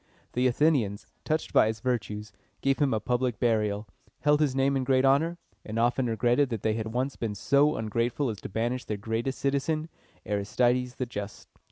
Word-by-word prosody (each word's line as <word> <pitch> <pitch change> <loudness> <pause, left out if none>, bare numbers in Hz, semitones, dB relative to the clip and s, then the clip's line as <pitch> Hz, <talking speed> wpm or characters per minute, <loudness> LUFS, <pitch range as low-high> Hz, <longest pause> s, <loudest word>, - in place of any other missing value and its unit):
The 125 +1 +2
Athenians, 120 -6 +1 0.2
touched 155 0 -1
by - - +6
his 110 0 -2
virtues, 105 -4 -2 0.3
gave 135 +1 +1
him 145 -3 +2
a 110 - +1
public 125 0 -1
burial, 105 -3 +1 0.3
held 150 +1 +3
his 140 -4 +2
name 135 +1 +2
in 135 - 0
great 130 0 +3
honor, 160 +6 +3 0.3
and 110 +1 -5
often 120 +2 +2
regretted 120 +4 +2
that 115 -5 -4
they 110 - +2
had 110 0 -3
once 125 +4 -2
been 110 -3 -3
so 140 +8 +3
ungrateful 115 +4 -1
as 105 - -9
to - - -6
banish 120 +5 -2
their 105 - -3
greatest 115 +5 -2
citizen, 150 +3 -1 0.4
Aristides 120 +5 +1
the 130 - -2
Just. 105 -4 -7
125 Hz, 185 wpm, -28 LUFS, 110-135 Hz, 0.4 s, by